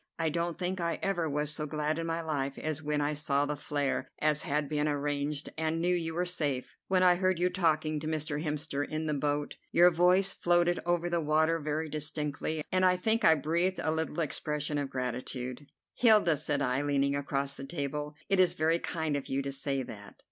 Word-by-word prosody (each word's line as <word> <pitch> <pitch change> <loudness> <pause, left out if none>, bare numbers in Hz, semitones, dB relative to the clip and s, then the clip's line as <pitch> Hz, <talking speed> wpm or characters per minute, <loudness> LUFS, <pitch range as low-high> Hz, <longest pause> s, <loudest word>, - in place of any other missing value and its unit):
I 165 -1 +1
don't 170 +1 -2
think 180 0 -2
I 170 0 -1
ever 175 -5 0
was 150 +1 0
so 155 -1 -3
glad 150 +1 -1
in 165 - -3
my 165 0 -2
life 140 -3 -2
as 155 -1 -3
when 150 -1 -1
I 145 +1 0
saw 145 -1 +1
the 150 +1 -2
flare, 145 -1 -2
as 150 -1 +2
had 150 -3 -1
been 150 +1 0
arranged, 145 0 -2
and 160 +1 0
knew 175 +2 +2
you 165 -2 -1
were 180 +1 0
safe. 145 -8 -2
When 185 -1 +3
I 180 -1 +6
heard 185 -1 +1
you 180 +1 +1
talking 155 -4 +1
to 155 - -5
Mr. 155 -1 -2
Hemster 150 -2 -2
in 155 +2 -3
the 155 - 0
boat, 145 0 -1
your 175 +1 +6
voice 180 +3 +4
floated 175 0 +2
over 175 0 +1
the 170 -1 0
water 160 +2 +2
very 155 +1 -2
distinctly, 150 0 -3
and 185 0 +2
I 180 0 +4
think 220 +5 +1
I 160 - +7
breathed 170 +5 0
a 155 - +1
little 160 +1 -1
expression 150 -1 -1
of 140 -1 -3
gratitude." 125 +1 -4 0.3
"Hilda," 215 -9 +5
said 145 -1 0
I, 125 +1 +1
leaning 140 -1 +1
across 140 0 -1
the 135 - -8
table, 150 0 -4
"it 195 - +2
is 185 -1 +4
very 160 +2 +2
kind 160 -4 -2
of 140 - -4
you 135 +1 0
to 140 - -3
say 135 0 -1
that." 105 -4 -10
155 Hz, 210 wpm, -30 LUFS, 145-170 Hz, 0.3 s, I